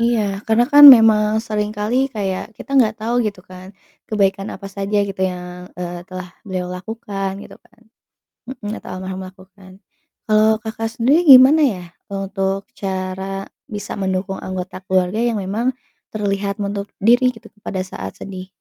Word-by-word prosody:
Iya, 235 -1 +2 0.3
karena 225 +2 +3
kan 290 0 +9
memang 220 -1 +4 0.2
sering 210 -1 -1
kali 210 +4 -1 0.2
kayak 195 -3 -2
kita - - -11
nggak 220 -3 +3
tahu 230 +3 -2
gitu 200 -3 -5
kan 185 0 -11 0.4
kebaikan 195 -1 0
apa 195 +1 -9
saja 200 +1 -2
gitu 195 -1 -7
yang, 180 0 -9
eee, 175 -1 -5
telah 185 -1 -7 0.2
beliau 185 -2 -3
lakukan 195 -1 -5
gitu - - -12
kan, 235 0 -29 0.7
mhm, 235 -5 -7
atau - - -12
almarhum 185 0 -6
lakukan. 185 0 -16 0.6
Kalau 215 0 +4
Kakak 225 0 -4
sendiri 265 +8 +3
gimana 265 +5 +7
ya 180 - -9 0.3
untuk 195 0 -2 0.2
cara 190 0 -4 0.3
bisa 205 0 -5
mendukung 190 0 -2
anggota 185 0 -6
keluarga 185 +2 +1
yang 235 0 +1
memang 215 +6 -2 0.5
terlihat 200 -1 -1
menutup 200 0 -4
diri 245 +4 +4
gitu 225 - -15 0.2
pada 185 -1 -2
saat 95 - -7
sedih? 185 -1 -8
200 Hz, 150 wpm, -19 LUFS, 185-220 Hz, 0.7 s, kan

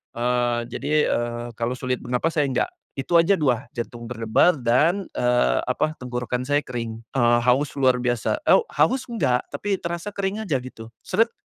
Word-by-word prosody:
eee, 120 0 +1
jadi, 140 +4 -4 0.2
eee, 120 0 -2
kalau 120 +1 -1
sulit 130 0 -2
bernafas 125 +7 -1
saya 145 - +3
enggak, 130 - 0 0.3
itu 135 +6 -1
aja 165 +4 +4
2, 130 -4 +1
jantung 120 0 -5
berdebar 120 +8 +2
dan, 155 +12 +2
eee, 120 - +2
apa, 155 0 -1
tenggorokan 125 0 -3
saya 145 +1 +2
kering, 115 -2 -5
eee, 120 -2 +4
haus 135 +3 +2
luar 130 -2 +4
biasa, 120 - 0
oh, - - +7
haus 260 0 +2
enggak, 140 - +1
tapi 195 +7 -1
terasa 170 +4 -4
kering 200 +2 -2
aja 155 -9 +1
gitu, 115 -3 -10
seret. 230 +1 +1
125 Hz, 170 wpm, -23 LUFS, 120-160 Hz, 0.3 s, oh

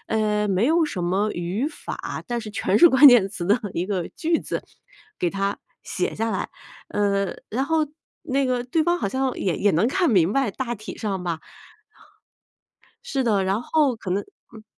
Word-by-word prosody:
呃， 210 -1 +1
没 195 +3 +2
有 325 +1 +3
什 180 - -3
么 195 +4 +1
语 185 - -2
法， 305 - -7
但 240 -1 -2
是 215 -2 -8
全 210 - 0
是 345 - +9
关 265 +2 +7
键 235 -7 +6
词 175 - -6
的 205 +5 +4 0.2
一 175 +2 -1
个 190 -4 -2
句 330 0 +1
子 - - -4 0.6
给 175 - +1
他 195 +1 -2 0.3
写 180 - -2
下 225 +1 -1
来。 - - -2 0.4
嗯， 200 -1 0
然 255 +5 0
后 320 -1 +1 0.4
那 270 +1 0
个 250 -1 -1
对 315 +6 +1
方 345 +2 +1
好 - - -1
像 260 +4 -1
也 185 -4 0
也 205 - +3
能 170 +7 +3
看 350 -1 +1
明 185 -3 +3
白， 270 -3 +1
大 240 +3 -4
体 215 0 -9
上 195 -4 -3
吧。 170 -2 -3 1.7
是 275 - -1
的， 210 -6 +2
然 195 +4 0
后 295 -4 +2
可 190 -4 -7
能 200 +3 0 0.3
嗯。 220 -1 -13
215 Hz, 205 characters per minute, -23 LUFS, 195-265 Hz, 1.7 s, 是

